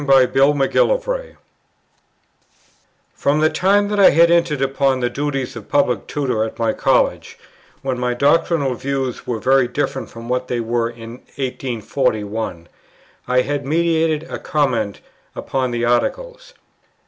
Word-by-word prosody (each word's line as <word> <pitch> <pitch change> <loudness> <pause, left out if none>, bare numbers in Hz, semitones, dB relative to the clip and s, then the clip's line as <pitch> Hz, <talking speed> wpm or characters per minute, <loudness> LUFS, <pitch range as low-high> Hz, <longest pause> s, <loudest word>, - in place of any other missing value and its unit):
From 135 +1 +4 2.8
the 155 0 +3
time 200 +2 +2
that 210 -1 -1
I 195 - +8
had 170 +2 +4
entered 170 -4 +2
upon 135 -1 +1
the 120 -1 -1
duties 135 -2 -3
of 110 -3 -10
Public 125 -7 +1
Tutor 130 -7 -1
at 110 - -5
my 115 -1 0
College, - - 0 0.5
when 130 -2 -2
my 125 0 -1
doctrinal 145 0 +2
views 135 0 -4
were 120 - -1
very 130 +3 +3
different 135 +1 -3
from 115 0 -10
what 125 +1 -1
they 125 - -2
were 115 0 -1
in 115 0 -10 0.2
1841, 115 -7 -3 0.6
I 125 0 +3
had 145 +1 -3
meditated 160 +1 +1
a - - -6
comment 130 -9 -1 0.3
upon 130 -1 -2
the 120 -1 -1
Articles. - - -2
135 Hz, 130 wpm, -19 LUFS, 120-150 Hz, 2.8 s, I